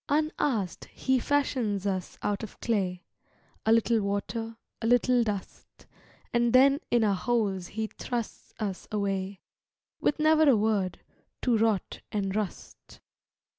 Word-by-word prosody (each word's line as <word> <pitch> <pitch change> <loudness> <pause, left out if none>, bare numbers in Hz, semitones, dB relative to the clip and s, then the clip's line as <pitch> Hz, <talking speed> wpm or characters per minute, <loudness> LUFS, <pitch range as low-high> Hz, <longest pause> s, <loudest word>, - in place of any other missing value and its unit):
Unasked 285 - 0
He 260 -1 0
fashions 240 -8 0
us 190 -2 -2
out 205 -1 0
of 220 - -8
clay, 185 -5 -1 0.6
A - - +5
little 230 0 +4
water, 225 +3 -3 0.2
a 225 - 0
little 245 0 +4
dust, 205 -4 -6 0.5
And 240 0 +2
then 275 +2 +6
in 240 -1 +3
our 205 -2 +3
holes 195 -4 0
He 220 0 -3
thrusts 235 +1 -5
us 200 -4 -4
away, 195 -2 -2 0.6
With - - +1
never 310 0 +5
a 250 - +6
word, 205 -4 0 0.4
to 245 -2 +3
rot 220 -3 0
and 195 -2 -1
rust. 210 -5 -5
220 Hz, 130 wpm, -28 LUFS, 200-245 Hz, 0.6 s, then